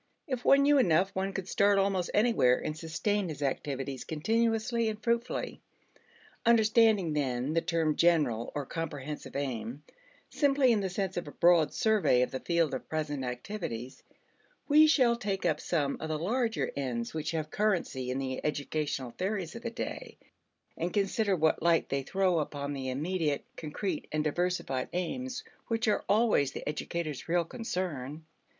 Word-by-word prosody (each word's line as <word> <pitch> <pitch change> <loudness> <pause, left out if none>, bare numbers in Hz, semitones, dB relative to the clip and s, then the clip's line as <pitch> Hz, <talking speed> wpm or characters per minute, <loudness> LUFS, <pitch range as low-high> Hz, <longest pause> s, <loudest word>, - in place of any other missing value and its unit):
If 255 -5 -3
one 275 0 +6
knew 290 0 +5
enough, 185 -3 +3
one 190 +1 -1
could 195 -1 -5
start 200 +1 +3
almost 195 -2 +1
anywhere 210 - +4
and 155 - -4
sustain 180 +5 -1
his 145 -2 -5
activities 135 -1 -3
continuously 225 +6 0
and 215 -1 -5
fruitfully. 235 +1 -2 0.8
Understanding 220 -6 +4
then 135 -1 -1
the 165 - +2
term 165 -3 0
general 145 -10 +2
or 145 -2 -2
comprehensive 150 -1 -5
aim 130 0 -3 0.4
simply 275 -3 +3
in 220 - +3
the 195 -1 -1
sense 190 0 -3
of 175 - -3
a - - -7
broad 170 -3 +4
survey 210 - +3
of - - -3
the 130 - -3
field 170 -1 +1
of - - -5
present 150 -3 -2
activities, 125 - -5 0.7
we 305 +1 +7
shall 255 -6 +4
take 200 -5 -3
up 155 -3 +1
some 145 -5 0
of 160 - -5
the 155 - -1
larger 225 +7 0
ends 125 -4 -3
which 155 -1 -3
have 155 -1 -3
currency 175 -11 0
in 130 - -1
the 130 -1 -3
educational 145 -3 -2
theories 185 - -3
of 230 - -7
the 235 - -3
day, 230 - -6 0.6
and 170 +2 -3
consider 200 0 +1
what 160 -2 +2
light 170 0 +3
they 140 0 0
throw 185 +4 +1
upon 145 -1 -3
the 135 -2 -4
immediate 150 +2 -1
concrete 160 +2 -4
and 155 0 0
diversified 155 -5 -1
aims 255 +8 -3 0.2
which 230 0 0
are 210 - +2
always 205 - +3
the - - -7
educator's 150 0 -4
real 170 0 +2
concern. 165 - -4
170 Hz, 160 wpm, -30 LUFS, 145-210 Hz, 0.8 s, we